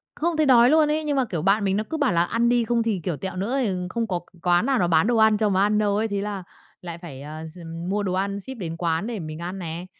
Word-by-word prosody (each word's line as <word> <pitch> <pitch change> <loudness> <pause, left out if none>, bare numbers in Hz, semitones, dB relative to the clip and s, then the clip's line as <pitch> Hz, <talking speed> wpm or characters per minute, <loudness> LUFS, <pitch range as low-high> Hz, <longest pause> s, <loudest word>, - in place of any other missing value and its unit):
Không 335 0 -1
thấy 310 -1 +2
đói 245 -2 +6
luôn 310 -1 +4
ấy, 310 +1 0
nhưng 295 -2 0
mà, 265 - +2
kiểu, 175 -9 -4
bạn 200 +2 +3
mình 195 0 +1
nó 215 - -1
cứ 320 - -1
bảo 285 - +1
là 170 0 +3
ăn 230 +6 +1
đi 240 -1 +3
không 235 0 +1
thì, 220 -5 -1
kiểu, 175 -4 -1
tẹo 190 +3 -6
nữa, 200 +6 -2
ờ, 180 -3 -2
không 230 +5 -2
có 180 -3 -1
c - - -14 0.2
quán 175 +5 +3
nào 270 -2 +2
nó 175 - +1
bán 165 +2 +3
đồ 240 0 +2
ăn 220 -1 +5
cho 215 -1 +2
mà 190 -1 +2
ăn 210 +1 +2
đâu 205 -1 +1
ấy, 220 +2 0
thế 200 -1 -2
là 205 -2 -4 0.4
lại 170 -2 -7
phải, 145 -6 -9
à, 155 +2 -7
gi 160 +3 -11 0.3
mua 205 +2 0
đồ 190 -2 -2
ăn 200 +2 -1
ship 265 +7 -8
đến 165 -4 -5
quán 165 +2 -1
để 235 -2 -4
mình 155 -3 -6
ăn 180 +3 -5
nè. 170 0 -6
200 Hz, 310 wpm, -24 LUFS, 175-230 Hz, 0.4 s, đói